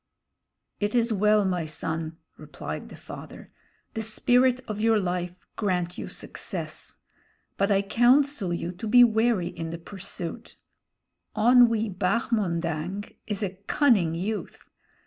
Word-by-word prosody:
"It 205 +2 -1
is 235 -1 +2
well, 210 0 +3
my 180 -3 0
son," 160 +1 -3 0.2
replied - - -7
the - - -10
father; - - -11 0.4
"the 220 - -3
spirit 245 +3 +3
of 210 -1 -4
your 225 -1 +4
life 180 -2 -2 0.2
grant 180 -4 -1
you - - -5
success. - - -6 0.6
But 195 +1 +1
I 200 -1 +3
counsel 240 0 +3
you 170 0 -2
to 185 +5 -7
be 245 +3 +8
wary 220 -5 +2
in 165 0 -6
the 165 - -5
pursuit. 180 -1 -7 0.8
Onwee 230 -3 +4
Bahmondang 185 -3 -1
is 210 -1 -2
a 195 - -1 0.2
cunning 205 - +3
youth. 205 +5 -5
205 Hz, 125 wpm, -26 LUFS, 175-230 Hz, 0.8 s, be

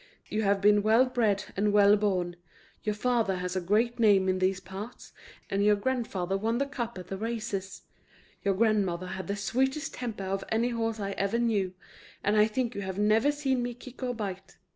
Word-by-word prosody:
You 215 - -1
have 200 -1 +2
been 205 0 +5
well 220 +4 +5
bred 225 -6 +1
and 205 +2 +2
well 205 0 +6
born; 185 -4 0 0.5
your 210 -1 -1
father 230 -3 +1
has 180 0 -3
a 185 - 0
great 220 +7 +1
name 200 -4 +5
in 185 0 +1
these 185 0 +1
parts, 190 +5 -9 0.3
and 200 +1 0
your 210 0 +5
grandfather 205 -5 -1
won 225 +3 0
the 280 - +1
cup 240 -6 -5
at 180 - -7
the 195 - -4
races; 215 -4 -4 0.6
your 195 -1 +2
grandmother 195 -5 +1
had 190 -2 -5
the 200 - -1
sweetest 265 +8 -1
temper 230 -5 -5
of 195 +1 -2
any 230 +2 +1
horse 225 -2 -2
I 200 -1 -2
ever 200 +3 -1
knew, 205 -6 0 0.5
and 205 - +2
I 210 0 +5
think 235 +2 -2
you 200 - -4
have 190 -1 -4
never 215 +7 +3
seen 270 -4 0
me 245 0 -3
kick 250 +1 -12
or 250 -1 -2
bite. 195 -3 -6
210 Hz, 200 wpm, -29 LUFS, 195-235 Hz, 0.6 s, well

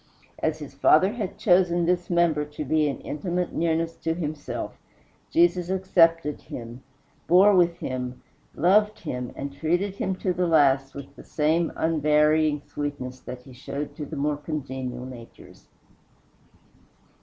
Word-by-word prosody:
As 155 -1 0
his 150 -3 -9
Father 155 +7 +4
had 200 -5 -4
chosen 175 -4 +3
this 175 0 0
member 170 -4 +2
to 150 0 -7
be 155 +2 +2
in 140 - -4
intimate 175 +4 -3
nearness 165 0 0
to 165 0 -2
himself, 155 -3 -5 0.5
Jesus 320 - +2
accepted 165 -5 +2
him, 120 +1 -9 0.5
bore 195 +4 +6
with 175 -1 +3
him, 125 -1 -5 0.3
loved 210 +6 +3
him, 125 -6 -4
and 140 0 -5
treated 175 +7 -1
him 190 - -1
to 185 0 -1
the 180 0 0
last 135 -4 +3
with 140 -1 -9
the - - -12
same 160 +2 +1
unvarying 150 -1 +2
sweetness 140 -3 -5
that 125 0 -9
he 130 0 -14
showed 140 +3 -6
to 150 - -6
the 160 - -7
more 145 +1 0
congenial 130 -5 -5
natures. 120 -3 -13
155 Hz, 145 wpm, -25 LUFS, 140-175 Hz, 0.5 s, bore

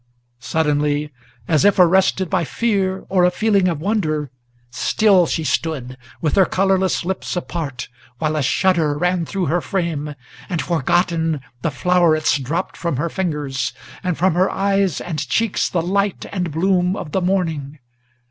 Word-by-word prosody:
Suddenly, 150 +1 0 0.4
as 155 0 +3
if 205 0 +4
arrested 190 +1 +4
by 185 0 0
fear 190 0 -1
or 185 -2 +2
a 180 - +6
feeling 200 0 +2
of 165 -4 -1
wonder, 155 - -1 0.4
Still 190 - +3
she 160 - -1
stood, 135 -2 -2 0.3
with 155 - 0
her 190 - +6
colorless 190 -2 +1
lips 190 +1 -3
apart, 155 -8 -4 0.3
while 155 +3 -1
a 155 - 0
shudder 160 +1 +2
Ran 180 0 0
through 195 -3 -2
her 170 +4 +1
frame, 160 -7 -2 0.3
and, 175 -4 -1
forgotten, 165 -1 0 0.2
the 165 - 0
flowerets 155 +1 +2
dropped 160 +8 -3
from 170 -5 -2
her 165 +5 -1
fingers, 150 -8 -2 0.3
And 180 -3 -1
from 185 0 +2
her 185 +3 +2
eyes 195 -4 0
and 160 -4 -4
cheeks 225 -3 +1
the 170 -2 -1
light 200 +2 0
and 180 -3 -2
bloom 180 +3 +1
of 150 - -6
the 190 - 0
morning. 165 -6 -1
175 Hz, 155 wpm, -20 LUFS, 150-190 Hz, 0.4 s, a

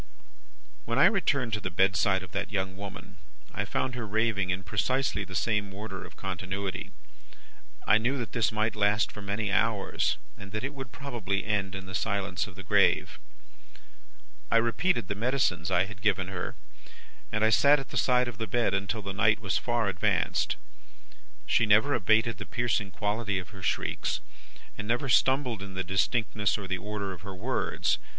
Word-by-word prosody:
"When 115 +1 -1
I 140 - +7
returned 145 - +2
to 105 - +1
the - - -3
bedside 95 +2 +2
of 95 - -11
the - - -2
young 95 -3 -2
woman, 100 0 -9 0.4
I - - -2
found 130 - -1
her 120 -3 -4
raving 105 -3 +1
in 90 +1 -1
precisely 105 +4 0
the 95 -1 -8
same 105 -1 +1
order 100 -2 -6
of - - -12
continuity. 95 0 -4 1.0
I 105 +2 +5
knew 125 +5 0
that 120 -3 -4
this 115 -4 +1
might 110 +1 0
last 105 0 +2
for 105 - -9
many 100 +1 -2
hours, 105 0 +1 0.2
and 100 -1 -11
that 105 +2 -2
it 140 +2 -3
would 135 -3 -7
probably 115 -7 -3
end 100 -3 0
in 95 -1 -6
the 95 - -9
silence 100 -1 -1
of 95 - -12
the 95 - -9
grave. 90 - +3 1.3
"I - - +4
repeated 115 +5 +1
the - - -1
medicines 100 -7 0
I 95 - +3
had 100 +1 -11
given 95 -3 +1
her, 90 -2 -4 0.8
and 110 0 0
I 110 - +4
sat 140 +8 +6
at 135 - -8
the - - -8
side 125 -1 +3
of 120 -3 -7
the 115 - -2
bed 115 -1 +1
until 100 +3 -1
the 100 0 -4
night 110 +2 +3
was 100 -5 0
far 120 -3 0
advanced. 90 -3 +1 0.9
She 115 - +3
never 110 +8 +5
abated 110 0 +2
the 100 - -6
piercing 120 -4 0
quality 105 +1 -1
of 90 - -5
her 95 -3 -11
shrieks, - - -1 0.6
never 120 +6 -1
stumbled 130 -4 +3
in 95 -1 -7
the 95 - -1
distinctness 105 +3 +1
or 100 -2 -6
the 95 0 -2
order 105 -1 -4
of 90 - -12
her 100 -1 -7
words. 120 +8 0
105 Hz, 180 wpm, -29 LUFS, 95-115 Hz, 1.3 s, I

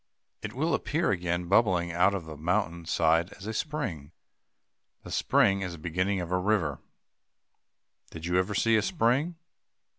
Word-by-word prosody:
It - - -6
will 155 +6 0
appear 160 -2 0
again, 90 -2 -1
bubbling 95 -4 +3
out 90 +4 +3
of 90 -4 -5
the 80 -1 -8
mountain 85 +1 -1
side 80 +1 +2
as 95 - -12
a 110 - -3
spring. 105 - -4 0.9
The - - -9
spring 100 -1 +3
is 90 -2 -4
the - - -8
beginning 95 +5 -1
of 85 0 -6
a 90 - +2
river. 90 -8 0 1.3
Did 80 0 -8
you 90 +1 +2
ever 95 +2 -1
see 115 +3 +3
a - - +3
spring? 155 0 +1
90 Hz, 160 wpm, -28 LUFS, 85-110 Hz, 1.3 s, bubbling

